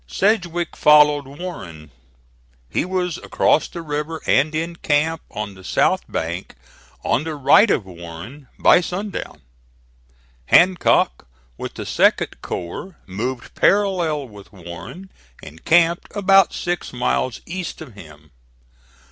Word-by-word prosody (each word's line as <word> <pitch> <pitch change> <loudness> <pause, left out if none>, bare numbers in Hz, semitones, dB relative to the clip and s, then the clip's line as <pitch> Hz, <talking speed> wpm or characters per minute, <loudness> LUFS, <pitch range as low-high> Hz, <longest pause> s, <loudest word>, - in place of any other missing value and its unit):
Sedgwick 175 - 0
followed 150 -2 +5
Warren. 95 - -9 0.8
He - - 0
was 180 -2 -2
across - - +1
the 170 - -8
river 150 +1 -4
and 155 +4 +2
in 165 +2 -3
camp 160 +2 0
on 105 -1 -5
the 95 -1 -15
south - - 0
bank, 85 +1 -4 0.5
on 140 - +1
the 160 -1 -4
right 150 +10 +5
of 105 - +1
Warren, 90 - -10
by - - +5
sundown. 180 - -5 1.0
Hancock, 175 - +3 0.3
with - - -7
the - - -5
2d - - +1
corps, 150 - -6
moved 120 +6 -5
parallel 175 -8 +1
with 105 -3 -14
Warren 90 - -10 0.3
and 80 +2 -12
camped 170 +1 +3
about 195 -2 +5
six 175 0 -3
miles 125 0 -1
east 180 0 -5
of 140 -8 -10
him. 75 -6 -15
150 Hz, 120 wpm, -21 LUFS, -, 1.0 s, followed